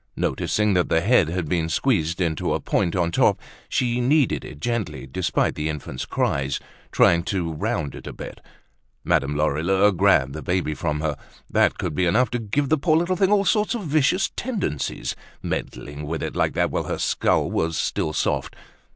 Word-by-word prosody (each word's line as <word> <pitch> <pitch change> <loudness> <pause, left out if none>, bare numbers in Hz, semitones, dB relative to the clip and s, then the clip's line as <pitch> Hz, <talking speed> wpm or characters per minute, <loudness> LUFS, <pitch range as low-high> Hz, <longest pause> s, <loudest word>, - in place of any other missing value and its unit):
Noticing 105 -1 +1
that 90 -1 +1
the 80 - +3
head 100 -3 +4
had 85 0 -2
been 80 -1 0
squeezed 85 - +1
into 80 -5 0
a - - -1
point 85 - 0
on 85 -2 +1
top, - - +3 0.3
she 125 -1 0
kneaded 140 +2 +2
it 70 - -10
gently 115 - -2
despite 75 +7 0
the 75 +1 -2
infant's 70 -4 -5
cries, 70 0 0 0.3
trying 85 -1 +4
to 85 -5 -2
round 75 -2 -2
it - - -10
a - - -4
bit. - - -9 0.6
Madame 70 +2 +1
Lorilleux 85 +7 +2
grabbed 70 -7 +3
the 80 - -6
baby 90 -3 -1
from 75 -1 -2
her; 75 -2 -1 0.4
that - - +3
could - - -3
be 90 +4 +1
enough 120 +9 +2
to 120 - -1
give 120 +6 -1
the 155 - +3
poor 155 +1 +3
little 175 +2 +1
thing 190 +2 +2
all 200 -1 +3
sorts 210 +3 +2
of 225 - -4
vicious 155 +4 +2
tendencies, 210 - -3 0.3
meddling 75 +1 -5
with 80 +1 -3
it - - -4
like - - +1
that - - +1
while - - -1
her - - -3
skull - - +1
was 80 0 0
still 80 - -1
soft. 75 - -1
90 Hz, 185 wpm, -23 LUFS, 75-125 Hz, 0.6 s, head